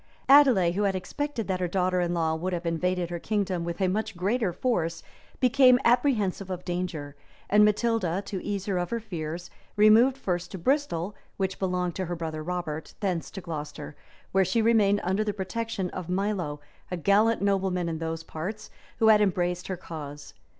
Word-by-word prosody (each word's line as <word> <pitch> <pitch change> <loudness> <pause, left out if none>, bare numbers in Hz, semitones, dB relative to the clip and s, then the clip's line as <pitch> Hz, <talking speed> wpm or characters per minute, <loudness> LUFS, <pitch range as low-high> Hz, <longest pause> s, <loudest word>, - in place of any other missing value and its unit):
Adelais, 260 -11 +6
who 190 +4 -1
had 200 -2 +1
expected 235 +6 -3
that 185 -1 -1
her 180 - 0
daughter 180 0 +1
in 175 -1 0
law 165 -2 +1
would 180 +4 -2
have 175 0 -3
invaded 175 +1 0
the 175 -1 -4
kingdom 190 -3 -1
with 170 +1 -4
a 190 - +2
much 210 +1 -2
greater 200 +2 0
force, 170 -5 -1 0.4
became 255 0 +6
apprehensive 230 -6 +2
of 180 -1 -5
danger; 175 -5 -4 0.4
and 210 +1 +6
Matilda, 210 -4 +1
to 190 -3 -5
ease 200 -2 -3
her 195 -3 0
of 175 -1 -2
her 235 - -1
fears, 175 -5 -6 0.2
removed 220 +5 +6
first 180 -7 -2
to - - -4
Bristol, 210 - 0 0.2
which 190 -1 -2
belonged 180 -2 -1
to 190 - -1
her 175 +1 -3
brother 160 -2 -4
Robert, 160 -2 -4
thence 185 -5 -2
to 190 - -8
Glocester, 155 -4 -6 0.4
where 195 0 +4
she 230 +5 +1
remained 215 -3 +3
under 190 +4 +1
the 210 -1 -2
protection 200 -1 -3
of 180 -2 -6
Milo, 180 -6 -1 0.3
a 180 - -3
gallant 205 +5 +3
nobleman 190 -3 +1
in 160 -1 -3
those 165 0 -4
parts, 190 +8 -6 0.3
who 220 - +4
had 210 -1 +6
embraced 180 -3 0
her 185 - -3
cause. 145 -4 -8
185 Hz, 185 wpm, -27 LUFS, 175-210 Hz, 0.4 s, Adelais